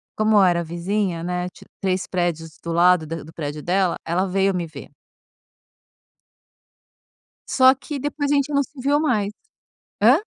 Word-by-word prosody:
Como 215 0 +3
eu 200 - +7
era 175 -2 +3
vizinha, 175 +1 -2
né, 180 0 -2
ti - - -17 0.2
3 185 -1 0
prédios 165 -3 -2
do 170 - -4
lado 175 0 +4
da 165 +1 -5
do 160 - -13
prédio 150 -2 -5
dela, 185 0 +1
ela 175 +3 0
veio 195 +1 +1
me 175 -2 -2
ver. 145 -2 -11 2.6
Só 260 0 +6
que 280 +2 -6
depois 290 +1 -2
a - - +3
gente 280 +1 +1
não 280 0 +3
se 275 0 -11
viu 285 +3 +2
mais. 215 -9 0 0.7
Hã? 250 +9 +6
185 Hz, 160 wpm, -22 LUFS, 170-250 Hz, 2.6 s, eu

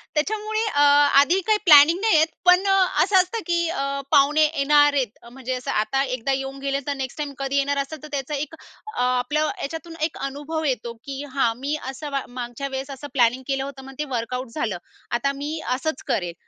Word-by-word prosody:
त्याच्यामुळे 430 +7 -1
अ, 290 -9 +1 0.4
आधी 345 +7 +2
काही 430 -1 +4
प्लॅनिंग 315 +2 +8
नाही 440 -2 +3
आहेत. 315 +1 +4 0.2
पण 360 +2 +5 0.4
असं 385 +2 0
असतं, 370 +5 +2
की 340 -1 +1
अ, 275 -3 -2
पाहुणे 295 +1 +5
येणार 290 -1 +3
आहेत, 255 -6 -1
म्हणजे 260 0 -5
असं 250 - -4
आता 220 +6 +1
एकदा 255 0 -2
येऊन 270 0 -4
गेले, 275 0 -1
तर 285 - 0
नेक्स्ट 265 -2 -5
टाईम 290 -2 -4
कधी 275 +1 -1
येणार 280 0 +1
असतात, 305 +2 -7
तर 305 - -7
त्याचा 280 +1 -3
एक 300 +3 -4 0.4
अ, - - -1
आपलं 250 +5 +1
याच्यातून 325 +3 -6
एक 330 - -14
अनुभव 295 +3 -5
येतो, 240 -4 -2
की 275 +1 -6
हां, 250 -5 +2
मी 285 +3 -2 0.2
असं 290 +2 -7
म 275 - 0
मागच्या 245 +2 -5
वेळेस 265 0 -5
असं 275 +2 -8
प्लॅनिंग 245 0 +2
केलं 270 -1 -1
होतं, 270 -1 -8
मग 270 - -10
ते 300 - -1
वर्कआउट 250 +2 -3
झालं. 230 - -2 0.3
आता 240 +4 +1
मी 310 +2 -3 0.2
असंच 315 0 -4
करेल, 175 -3 -1
280 Hz, 200 wpm, -23 LUFS, 265-310 Hz, 0.4 s, प्लॅनिंग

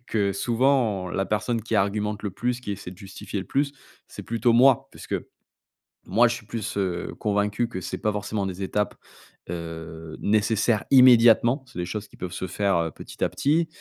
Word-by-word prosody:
que, 100 -3 0
souvent, 115 -3 +1
la 95 +2 -1
personne 110 +2 -1
qui 110 - -3
argumente 105 +1 0
le 100 - -1
plus, 125 +5 -2
qui 105 -5 -4
essaie 100 -2 -7
de 90 - -12
justifier 100 0 -7
le 95 - -8
plus, 140 +1 0 0.4
c'est - - -9
plutôt 115 +1 +1
moi, 125 +2 +5
puisque - - -6 0.9
moi, 120 +2 +5
je 115 - 0
suis 115 - -11
plus, 110 -2 -4
heu, 90 -3 -2
convaincu 105 +2 0
que 95 - -5
c'est - - -4
pas 105 - 0
forcément 105 0 -2
des 95 +1 -5
étapes, 105 +2 -1 0.6
heu, 80 -1 -7
nécessaires 110 +1 +2
immédiatement. 120 0 +6
C'est 125 - -13
des 90 - -1
choses 105 +4 -5
qui - - -19
peuvent 90 -1 -5
se 95 0 -4
faire, 100 +2 0
heu, 85 - 0
petit - - -7
à - - +2
petit. 160 +4 +1
105 Hz, 190 wpm, -25 LUFS, 95-120 Hz, 0.9 s, immédiatement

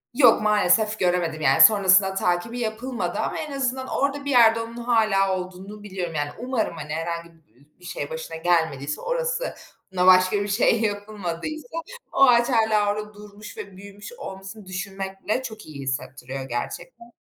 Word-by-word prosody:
Yok, 245 -5 +6
maalesef 210 +1 +2
göremedim. 175 -3 0
Yani 135 -2 +4
sonrasında 190 -2 +6
takibi 190 +7 -1
yapılmadı 235 +2 -3
ama - - -2
en 305 -2 -5
az 265 -2 0 0.2
orada 280 +1 -1
bir 285 - -1
yerde 230 -2 +6
onun 230 +1 -8
hâlâ 215 -5 +2
olduğunu 185 +3 -8
biliyorum. 185 -5 -5
Yani 145 0 -1
umarım 240 -6 -2
hani 150 - -6
herhangi 170 +1 -4
bi 140 -5 -27
bir 180 - -16
şey 145 -4 -5
başına 160 0 -6
gelmediyse, 160 -4 0
orasına 485 - -3
başka 185 +2 +5
bir - - -4
şey 215 +2 +2
yapılmadıysa 205 - -4 0.4
o - - -1
ağaç 240 -1 +5
hâlâ 220 -4 +3
orada 210 0 -6
durmuş 210 0 -12
ve 195 -2 -9
büyümüş 200 - -11
olmasını 195 - -9
düşünmek 195 +1 -6
bile 215 +5 0
çok 220 -3 -8
iyi 145 -3 -9
hissettiriyor 130 0 -5
gerçekten. 175 - -6
200 Hz, 155 wpm, -24 LUFS, 175-230 Hz, 0.4 s, Yok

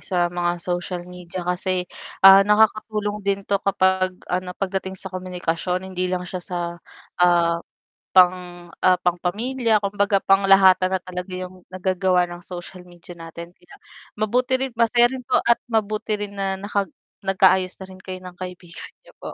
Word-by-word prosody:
sa 175 -2 -1
mga 175 0 -1
social 175 0 -3
media 180 0 -8
kasi, 180 +1 -1 0.4
ah, 195 0 +10
nakakatulong 210 0 +1
din 200 0 -2
'to 200 0 0
kapag 185 -1 +1
ano 180 0 -3
'pag 195 -1 -3
dating 190 0 -8
sa 190 0 -9
komunikasyon, 180 0 -3
hindi 185 0 -1
lang 180 0 -2
siya 180 +1 -6
sa, 180 0 -5 0.6
ah, 170 -1 +3 0.5
pang 180 -1 +3 0.2
ah, 185 -1 +5
pangpamilya, 215 +6 0
kumbaga 200 0 +1
panglahatan 195 -1 +5
na 190 - 0
talaga 180 0 -7
yung 185 0 -8
nagagawa 185 -1 +1
ng 175 0 -10
social 180 0 -9
media 175 0 -14
natin, 170 +1 -9
kaya 175 0 -21 0.4
mabuti 245 +5 0
rin 265 - -1
masaya 240 +1 +4
rin 260 -1 -7
po - - +2
at 235 - +3
mabuti 215 -2 -1
rin 205 -1 -5
na 195 -1 -2
naka 200 0 -1 0.4
nag 195 -1 -1
ka-ayos 185 -1 +4
na 190 - -8
rin 185 - -12
kayo 185 0 -8
ng 180 -1 -11
kaibigan 180 -1 -9
niyo - - -21
po. - - -8
185 Hz, 165 wpm, -22 LUFS, 180-200 Hz, 0.6 s, ah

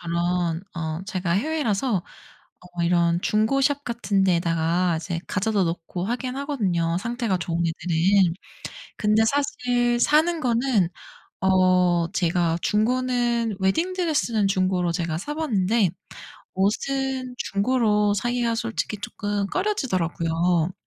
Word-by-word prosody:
저런 170 0 -1
어 160 0 -4
제가 185 -4 -2
해외라서 245 - 0 0.6
어 175 -1 -6
이런 170 0 +2
중고 220 +8 +1
샵 285 +1 +1
같은 200 -5 0
데에다가 170 0 +1
이제 165 +1 -4
가져다 205 -1 0
놓고 170 +1 -4
하기는 250 +2 -3
하거든요 185 - -1
상태가 230 -2 -1
좋은 170 -1 -3
애들은. 170 +3 +2 0.6
근데 215 +1 +3
사실 245 -3 0
사는 315 +5 +3
거는 235 - +1 0.5
어 180 -2 +3
제가 170 -2 +1
중고는 240 -1 0
웨딩드레스는 295 - +1
중고로 185 -2 +1
제가 165 -2 -2
사봤는데 225 - 0 0.6
옷은 255 +6 -1
중고로 210 -1 +1
사기가 240 +2 0
솔직히 225 -2 -3
쪼끔 205 -1 -3
꺼려지더라고요. 180 - 0
200 Hz, 265 characters per minute, -24 LUFS, 175-245 Hz, 0.6 s, 근데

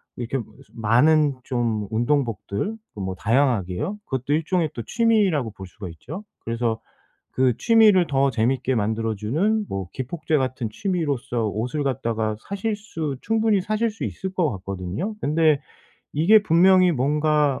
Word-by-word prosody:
이렇게 120 +2 -3
무슨 130 +4 -13
많은 145 +6 +4
좀 115 -6 -1
운동복들 120 - -1 0.2
그 - - -8
뭐 95 -1 -3
다양하게요. 120 - 0
그것도 130 +2 -2
일종의 160 0 0
또 115 - -5
취미라고 200 - +2
볼 95 -2 -10
수가 90 0 -9
있죠? 150 - -8 0.2
그래서 115 -1 -1 0.5
그 130 -2 +2
취미를 215 -6 +5
더 135 -1 +2
재미있게 125 +3 0
만들어 110 +1 -1
주는 185 - 0
뭐 95 -2 -4
기폭제 155 +4 -2
같은 130 -3 -2
취미로써 145 - -1
옷을 120 +8 -2
갖다가 115 -4 -1
사실 205 +2 -2
수 165 -9 -5
충분히 220 -2 +2
사실 215 +3 0
수 220 - -8
있을 190 0 -5
것 170 -6 +1
같거든요. 100 - -4
근데 155 0 +3 0.6
이게 200 +8 +5
분명히 185 0 +5
뭔가 150 +1 +1
140 Hz, 315 characters per minute, -23 LUFS, 115-180 Hz, 0.6 s, 취미를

